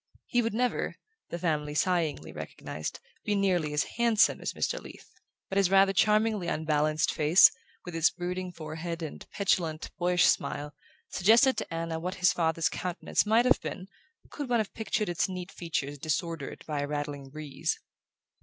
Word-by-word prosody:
He 245 - +1
would 225 -2 -2
never, 250 +1 0 0.3
the 170 - -4
family 150 -4 -1
sighingly 155 - 0
recognized, 75 0 -6 0.2
be 210 - 0
nearly 180 -6 +1
as 150 0 +1
handsome 230 -2 +3
as - - -3
Mr. - - -1
Leath; - - -13 0.4
but 195 - 0
his 195 -3 +3
rather 195 0 +5
charmingly 210 -1 +2
unbalanced 155 -1 +1
face, 155 +4 +7 0.3
with 175 - -7
its 165 -1 +4
brooding 180 +1 -4
forehead 165 +1 -6
and 155 - -6
petulant 170 -6 0
boyish 180 0 +3
smile, 145 0 0 0.4
suggested 230 +8 +5
to - - -4
Anna 165 0 -3
what 180 +3 -4
his 180 -1 +3
father's 165 -1 +1
countenance 180 +3 -1
might 225 +3 +4
have 255 - +4
been 185 0 -6 0.4
could 285 -4 -5
one 240 -1 +3
have 215 - -2
pictured 215 -1 -1
its 175 +2 0
neat 185 0 -6
features 145 -4 -3
disordered 160 0 -3
by 150 -2 -3
a 145 - -1
rattling 145 -2 -4
breeze. 150 0 -3
175 Hz, 165 wpm, -29 LUFS, 155-195 Hz, 0.4 s, face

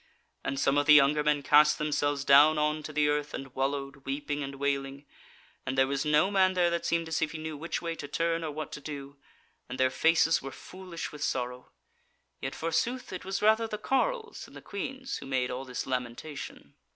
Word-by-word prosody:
and 135 - -2
some 140 +1 +3
of 145 - -1
the 150 - +9
younger 150 +1 +5
men 150 -1 +1
cast 150 +2 +5
themselves 145 -2 -1
down 145 +3 +7
on 150 +1 +1
to 155 - -7
the 150 0 +2
earth, 150 0 -1
and 135 -2 -8
wallowed, 135 +1 -2
weeping 145 +2 -4
and 140 0 -5
wailing: 140 0 -2 0.6
and 130 +1 -3
there 135 - +5
was 140 +1 -1
no 150 +5 +3
man 190 -1 +4
there 175 -1 +3
that 170 0 -1
seemed 165 -1 0
as 160 -1 -1
if 155 - -1
he - - -5
knew 155 0 -5
which 165 +4 -4
way 165 -1 -2
to 150 -3 -7
turn, 165 +2 -1
or 160 - -2
what 150 +1 -6
to 150 - -7
do; 140 -1 -7 0.5
and 125 - -6
their 130 0 +3
faces 165 +3 +3
were 135 - -6
foolish 180 0 -8
with 150 -1 -6
sorrow. 125 -1 -3 0.7
Yet - - -4
forsooth 235 +9 -2
it 185 - -6
was 195 +2 -3
rather 220 +1 +4
the 215 - -4
carles 450 - -1
than - - -16
the - - -9
queans 265 +6 -5
who - - -9
made 130 -2 0
all 130 +2 -5
this 125 -2 -4
lamentation. 130 +3 -5
150 Hz, 210 wpm, -29 LUFS, 140-165 Hz, 0.7 s, the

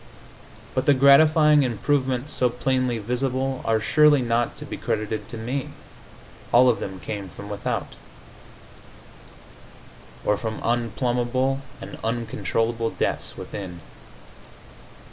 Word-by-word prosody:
But 130 - -1
the 145 - +6
gratifying 150 +2 +6
improvements 130 +2 0
so 125 - +2
plainly 125 0 0
visible 130 +4 -2
are 110 -1 +2
surely 145 +4 +4
not 115 0 0
to - - -8
be - - -6
credited 110 0 -3
to 115 - -7
me. 125 +5 -3 0.8
All 125 +1 +6
of 120 - +1
them 95 -1 -6
came 100 -1 -6
from 100 +4 -10
without 105 0 -3 2.3
or 105 - +2
from 110 0 -4
unplumbable 120 +3 0 0.2
and - - -9
uncontrollable 115 0 -1
depths - - -3
within. 90 -4 -7
120 Hz, 110 wpm, -24 LUFS, 110-135 Hz, 2.3 s, the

